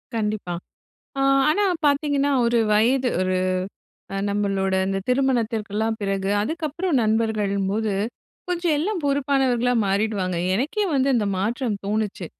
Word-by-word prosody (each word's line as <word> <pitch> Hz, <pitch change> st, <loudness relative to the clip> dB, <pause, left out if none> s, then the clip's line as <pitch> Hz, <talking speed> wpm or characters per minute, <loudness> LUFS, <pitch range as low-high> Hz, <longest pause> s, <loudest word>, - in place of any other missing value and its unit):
கண்டிப்பா. 210 Hz, -5 st, -2 dB, 0.7 s
அ -, -, +1 dB, 0.3 s
ஆனா 410 Hz, +7 st, +2 dB, 0.2 s
பார்த்தீங்கன்னா, 285 Hz, 0 st, +2 dB
ஒரு 235 Hz, 0 st, +2 dB
வயது 250 Hz, +4 st, +3 dB
ஒரு 185 Hz, 0 st, 0 dB, 0.8 s
அ -, -, -2 dB
நம்மளோட 195 Hz, -2 st, 0 dB
அந்த 195 Hz, 0 st, -1 dB
திருமணத்திற்கெல்லாம் 225 Hz, -4 st, 0 dB
பிறகு, 195 Hz, -1 st, -1 dB
அதுக்கப்பறம் 320 Hz, -, -1 dB
நண்பர்கள்னும்போது, 215 Hz, -1 st, 0 dB, 0.6 s
கொஞ்சம் 345 Hz, -3 st, 0 dB
எல்லாம் 370 Hz, +4 st, -1 dB
பொறுப்பானவர்களா 270 Hz, -3 st, +1 dB
மாறிடுவாங்க. 195 Hz, -2 st, 0 dB, 0.2 s
எனக்கே 300 Hz, -, 0 dB
வந்து 270 Hz, 0 st, +2 dB
அந்த 220 Hz, -4 st, +1 dB
மாற்றம் 220 Hz, +3 st, -1 dB
தோணுச்சு. 210 Hz, -3 st, -2 dB
225 Hz, 110 wpm, -23 LUFS, 205-275 Hz, 0.8 s, வயது